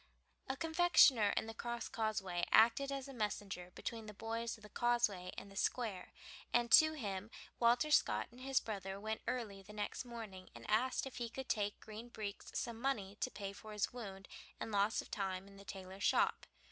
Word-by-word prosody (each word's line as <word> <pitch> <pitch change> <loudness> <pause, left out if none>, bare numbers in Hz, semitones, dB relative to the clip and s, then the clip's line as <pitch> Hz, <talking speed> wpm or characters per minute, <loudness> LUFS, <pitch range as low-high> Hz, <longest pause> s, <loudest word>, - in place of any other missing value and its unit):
A 265 - -1
confectioner 320 - +6
in - - +1
the 225 - -6
Crosscauseway 220 -6 -2
acted 235 +5 +6
as 275 0 -3
messenger 205 -7 -3
between 225 -2 -5
the 210 - -8
boys 230 +2 -3
of 215 - -19
the 210 - -11
Causeway 225 -7 +1
and 200 - -7
the - - -13
Square, 200 -3 -1 0.4
and 240 -1 +2
to 315 0 +9
him 205 -7 -4 0.3
Walter 245 +5 +4
Scott - - +4
and 245 +2 -14
his 270 0 +2
brother 195 -2 -5
went 220 +1 -3
early 215 -6 -2
the 205 +2 -12
next 210 +4 -3
morning 220 -6 -8
and - - -10
asked 240 +6 +2
if 265 - -7
he 235 -2 -3
would 265 -1 -4
take 205 -2 0
Green 220 +2 -8
Breeks 210 -3 -6
some 235 -1 -3
money 210 -8 -1
to - - 0
pay 200 -5 -5
for 215 +1 -10
his 210 +2 0
wound 195 -6 -7 0.3
and 225 - -4
loss 205 +2 +2
of - - -17
time 190 -1 -2
in 195 0 -14
the 200 - -11
tailor's 190 0 -8
shop. - - +3
220 Hz, 190 wpm, -37 LUFS, 200-240 Hz, 0.4 s, to